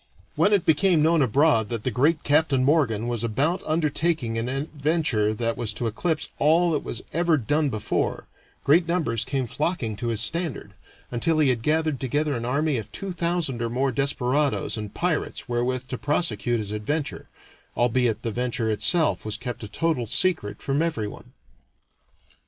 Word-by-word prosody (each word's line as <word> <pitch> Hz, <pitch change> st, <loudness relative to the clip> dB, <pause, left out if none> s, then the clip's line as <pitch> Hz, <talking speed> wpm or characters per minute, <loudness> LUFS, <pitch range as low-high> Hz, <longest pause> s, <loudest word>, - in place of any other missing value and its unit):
When 205 Hz, -, +3 dB
it 200 Hz, -4 st, +3 dB
became 160 Hz, 0 st, +3 dB
known 165 Hz, 0 st, +3 dB
abroad 130 Hz, -3 st, +3 dB
that 115 Hz, -3 st, -3 dB
the 130 Hz, -, 0 dB
great 145 Hz, +7 st, +2 dB
Captain 145 Hz, -3 st, +3 dB
Morgan 125 Hz, -7 st, +2 dB
was 120 Hz, -2 st, -2 dB
about 140 Hz, -, 0 dB
undertaking 155 Hz, -5 st, 0 dB
an 115 Hz, +2 st, -2 dB
adventure 140 Hz, -5 st, 0 dB
that 115 Hz, +1 st, -1 dB
was 110 Hz, -3 st, -1 dB
to 120 Hz, -, -3 dB
eclipse 155 Hz, +8 st, -2 dB
all 165 Hz, +4 st, +4 dB
that 150 Hz, -, -1 dB
was 120 Hz, -, -5 dB
ever 170 Hz, 0 st, +2 dB
done 145 Hz, +4 st, +1 dB
before, 110 Hz, -4 st, -2 dB, 0.4 s
great 165 Hz, +4 st, +4 dB
numbers 150 Hz, -11 st, 0 dB
came 135 Hz, +1 st, -2 dB
flocking 120 Hz, -, -2 dB
to 120 Hz, -, -4 dB
his 115 Hz, -2 st, -1 dB
standard, 140 Hz, -, -1 dB, 0.4 s
until 155 Hz, +7 st, +1 dB
he 150 Hz, -3 st, +4 dB
had 120 Hz, -3 st, 0 dB
gathered 155 Hz, 0 st, 0 dB
together 145 Hz, +3 st, 0 dB
an 120 Hz, -2 st, -3 dB
army 145 Hz, +3 st, 0 dB
of 110 Hz, -, -9 dB
two 195 Hz, -1 st, -4 dB
thousand 170 Hz, -7 st, -1 dB
or 115 Hz, -, -1 dB
more 130 Hz, +3 st, 0 dB
desperadoes 140 Hz, +1 st, 0 dB
and 105 Hz, -2 st, -6 dB
pirates 175 Hz, -3 st, -2 dB
wherewith 125 Hz, +1 st, -1 dB
to 125 Hz, -, -4 dB
prosecute 120 Hz, -, 0 dB
his 105 Hz, -2 st, -4 dB
adventure, 140 Hz, +8 st, -3 dB, 0.5 s
albeit 120 Hz, -2 st, +1 dB
the 115 Hz, -, -1 dB
venture 120 Hz, -1 st, -1 dB
itself 160 Hz, -, +2 dB
was 110 Hz, 0 st, -3 dB
kept 120 Hz, 0 st, -6 dB
a -, -, -5 dB
total 125 Hz, +2 st, -1 dB
secret 140 Hz, -, +1 dB
from 140 Hz, +2 st, 0 dB
everyone. 115 Hz, -11 st, -4 dB
135 Hz, 170 wpm, -25 LUFS, 115-160 Hz, 0.5 s, all